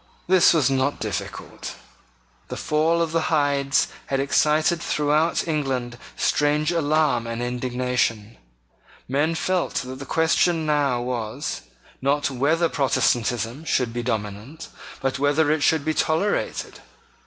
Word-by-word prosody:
This 185 0 +5
was 145 -5 +2
not 135 +2 0
difficult. - - -5 0.7
The - - -6
fall 160 +2 +1
of 165 - -3
the 165 0 0
Hydes 145 -3 +2 0.2
had 135 - -1
excited 155 +4 +2
throughout 150 +2 +1
England 130 -6 -2 0.2
strange 150 +2 +1
alarm 150 -7 +1
and 115 0 -4
indignation: 125 -3 -2 0.7
Men 145 +5 0
felt 185 +2 -1
that 130 0 -4
the 140 - -7
question 165 +1 +2
now 145 -5 +1
was, 125 +2 -4 0.4
not 140 +1 +1
whether 155 +6 +2
Protestantism 125 -2 0
should 125 -7 0
be 120 - -2
dominant, 110 +4 -5 0.3
but 135 0 -1
whether 145 +2 +2
it 155 -1 +1
should 155 0 +2
be 155 - +1
tolerated. 160 +7 -1
145 Hz, 125 wpm, -23 LUFS, 125-155 Hz, 0.7 s, This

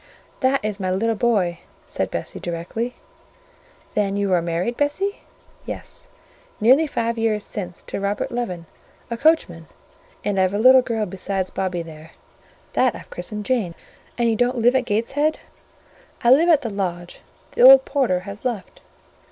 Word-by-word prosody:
"That 260 -3 +1
is 210 -1 -3
my 185 -1 -2
little 220 +5 +1
boy," 200 -7 +1 0.3
said - - -2
Bessie - - -5
directly. 175 +8 -4 1.0
"Then 200 -1 0
you 200 -2 0
are 175 - +3
married, 170 +8 -2
Bessie?" 300 +9 -1 0.5
"Yes; - - -8 0.5
nearly 265 +9 +5
five 230 -4 -2
years 215 -2 0
since 180 -4 -6
to - - -5
Robert 200 +1 -2
Leaven, 185 -9 -4 0.4
the 235 - -3
coachman; 230 - +1 0.6
and 200 -2 0
I've 185 +1 +2
a - - +1
little 255 +4 +7
girl 225 -3 -2
besides 190 0 -3
Bobby 180 -3 -2
there, 160 -1 -12 0.6
that - - +2
I've - - -12
christened 210 - -6
Jane." 215 -10 0 0.4
"And 235 -1 +2
you 225 - +2
don't 245 +3 +1
live 240 +2 +4
at 260 -1 +2
Gateshead?" 270 +8 0 0.9
"I 240 - +5
live 320 +7 +6
at 305 -4 +5
the 230 - -3
lodge: 175 -3 -4 0.3
the - - -2
old - - +9
porter 245 - +1
has 200 +1 -9
left." 240 -6 -4
215 Hz, 160 wpm, -22 LUFS, 185-250 Hz, 1.0 s, old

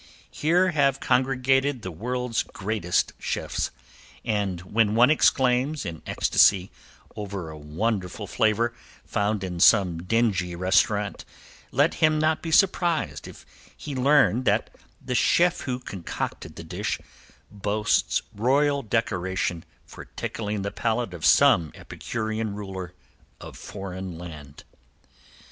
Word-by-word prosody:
Here 180 +4 +2
have 140 -4 +2
congregated 130 0 +1
the 95 - -5
world's 125 +6 -2
greatest 100 -3 -1
chefs, - - -2 0.6
and 100 -5 -1
when 105 +3 +1
one 125 +4 +6
exclaims 130 -1 +2
in 80 -4 -6
ecstasy 95 -1 +3 0.4
over 100 -6 -5
a 80 - -9
wonderful 95 +6 -3
flavor 115 +3 +1 0.3
found 105 -1 -1
in 90 -2 -4
some 90 -4 +4
dingy 95 -3 0
restaurant, 95 +3 +1 0.5
let 145 +6 +3
him 155 -1 +4
not 155 +1 +1
be 165 - -5
surprised 175 -2 +1
if - - -13 0.3
he 145 - -7
learn 135 -2 +3
that - - +1 0.3
the 125 - -5
chef 175 +7 +3
who 125 -2 -3
concocted 95 -8 -6
the - - -8
dish - - -3 0.5
boasts 105 +1 0
royal 140 +6 +2
decoration 95 -7 -1 0.2
for - - -11
tickling 105 -2 -4
the 100 - -3
palate 115 -3 -1
of 85 -3 -9
some 80 -3 +5
epicurean 110 -2 -4
ruler 95 -3 -7 0.4
of - - -10
foreign 95 -3 -7
land. 75 -5 -10
110 Hz, 120 wpm, -25 LUFS, 95-130 Hz, 0.6 s, one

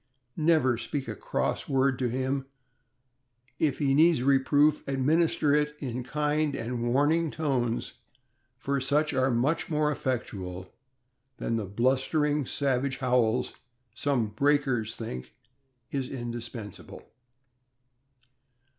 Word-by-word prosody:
Never 155 -7 +3
speak 135 +4 -4
a - - -3
cross - - -2
word 135 -1 +2
to 125 -2 0
him; 130 +2 -2 1.1
if 145 -4 +1
he 140 -3 +1
needs 155 -2 +4
reproof, 145 +2 +3
administer 145 +2 +2
it 150 0 +1
in 125 -3 -4
kind 150 +2 0
and 120 0 -2
warning 155 +5 +2
tones, 130 -7 -2 0.6
for 140 +1 -1
such 145 +3 +1
are 130 0 +2
far 125 +7 +2
more 150 -1 +1
effectual 95 -10 -4 0.6
than 115 - -2
the 110 -3 -2
blustering, 135 - +1
savage 135 -1 0
howls 125 -2 +1 0.4
some 125 -4 0
"breakers" 130 -2 +1
think 65 - -7 0.6
indispensable. 120 -5 -6
135 Hz, 105 wpm, -28 LUFS, 120-145 Hz, 1.1 s, needs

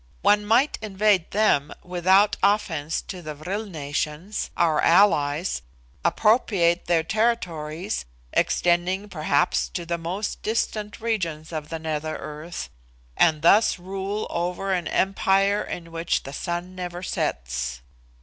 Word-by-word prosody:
One 205 +1 +4
might 255 +7 +3
invade 205 -3 +2
them 195 -9 +2
without 185 +3 +3
offence 165 -7 +1
to 185 -2 -7
the 155 -2 -6
vril 190 +9 -4
nations, 155 +3 -3
our 160 -3 +3
allies, 165 - +3 0.4
appropriate 180 -2 +3
their 165 -2 +2
territories, 170 - -1 0.3
extending, 180 +4 +1
perhaps, 155 -5 +1
to 175 - -5
the 170 0 -2
most 185 +6 -4
distant 215 -1 -2
regions 170 -9 -2
of 155 -1 -4
the 165 - -3
nether 155 -1 -3
earth, 155 +3 -7 0.4
and 155 -1 +3
thus 210 +6 +5
rule 195 +3 -4
over 180 +3 -1
an 175 -2 -1
empire 195 +1 +2
in 165 -1 -6
which 165 +1 -1
the 135 - -8
sun 175 +3 -4
never 180 -1 -6
sets. 65 - -2
175 Hz, 125 wpm, -24 LUFS, 155-200 Hz, 0.4 s, thus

